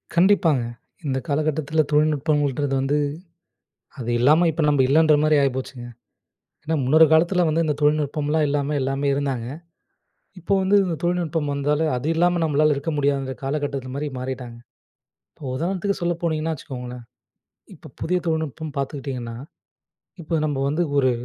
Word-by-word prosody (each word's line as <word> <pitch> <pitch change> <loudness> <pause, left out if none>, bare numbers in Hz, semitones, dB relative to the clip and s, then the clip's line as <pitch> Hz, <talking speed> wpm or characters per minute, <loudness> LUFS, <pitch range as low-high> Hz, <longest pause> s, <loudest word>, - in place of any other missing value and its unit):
கண்டிப்பாங்க. 170 -7 +4 0.4
இந்த 130 -1 0
காலகட்டத்துல 155 +1 0
தொழில்நுட்பங்கள்ன்றது 145 -2 +1
வந்து, 140 +2 +1 1.0
அது 120 -2 -4
இல்லாம 155 +8 +4
இப்ப 160 +1 -2
நம்ப 145 -2 +3
இல்லன்ற 155 +2 +5
மாரி 155 0 +4
ஆயி 135 - +3
போச்சுங்க, 130 -2 -6 0.8
ஏன்னா 160 +1 -1
முன்னொரு 155 +5 +6
காலத்துல 175 +3 +3
வந்து 165 +2 +1
இந்த 150 -2 0
தொழில்நுட்பம்லாம் 150 +1 +1
இல்லாம 145 0 -1
எல்லாமே 135 +2 -1
இருந்தாங்க. 135 -4 -2 0.9
இப்போ 180 +4 0
வந்து 195 +2 +3
இந்த 175 - -1
தொழில்நுட்பம் 170 -4 -1
வந்தாலே 145 +2 0
அது 125 +5 -3
இல்லாம 175 +1 +2
நம்மளால 155 -1 +3
இருக்க 140 +4 -3
முடியாதுன்ற 140 -2 0
காலகட்டத்துக்கு 135 -2 -3
மாரி 150 +1 -2
மாறிட்டாங்க. 125 -2 -6 0.8
இப்ப 140 - -8
உதாரணத்துக்கு 190 +6 -2
சொல்ல 175 0 +1
போனீங்கன்னா, 160 -1 0
வச்சுக்கோங்களேன், 125 -4 -8 0.7
இப்போ - - -14
புதிய 180 +2 0
தொழில்நுட்பம் 160 -2 -3
பாத்துக்கிட்டீங்கன்னா, 135 -4 -4 0.9
இப்ப 165 0 -1
நம்ப 145 -3 -2
வந்து 155 +4 0 0.2
ஒரு 130 -2 +4
150 Hz, 135 wpm, -23 LUFS, 135-160 Hz, 1.0 s, முன்னொரு